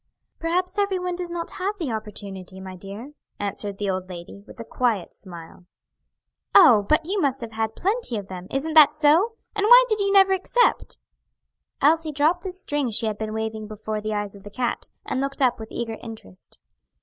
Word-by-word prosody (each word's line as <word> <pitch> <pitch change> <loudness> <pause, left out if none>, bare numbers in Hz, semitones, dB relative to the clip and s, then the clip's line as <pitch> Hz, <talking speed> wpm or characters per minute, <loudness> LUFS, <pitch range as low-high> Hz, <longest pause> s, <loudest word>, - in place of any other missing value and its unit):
"Perhaps 360 +4 -1
every 400 -2 +1
one 360 -1 -3
does 355 -1 -5
not 340 -1 -4
have 400 +3 -3
the 320 -10 -3
opportunity, 200 -4 -6
my 190 -1 -8
dear," 200 +9 -9 0.3
answered 200 0 -4
the 205 - -3
old 185 -1 -2
lady, 175 +2 -9
with - - -14
a - - -5
quiet 225 -6 -1
smile. 175 -1 -11 0.9
"Oh, 210 -4 +7
but 310 +1 +3
you 395 +1 0
must 270 -3 +1
have 230 -1 -6
had 220 0 -2
plenty 400 - -1
of 200 -2 -6
them. 185 -1 -8
Isn't 295 +4 -2
that 300 -2 +7
so? 315 +9 +4 0.2
and 415 - 0
why - - +8
did 430 -3 0
you 400 0 +1
never 385 -1 +6
accept?" 475 +6 +1 0.9
Elsie 315 +2 +3
dropped 305 +5 +2
the 375 - -4
string 295 -7 -1
she 225 +1 +1
had 215 -1 -2
been 215 -1 -3
waving 220 0 -4
before 215 0 -5
the 215 0 -3
eyes 205 -1 -3
of 200 - -13
the 205 - -10
cat, 245 +3 -3 0.2
and 260 - -2
looked 275 0 -3
up 255 -4 +2
with 220 0 -9
eager 225 -2 -4
interest. 220 - -11
240 Hz, 195 wpm, -24 LUFS, 205-345 Hz, 0.9 s, why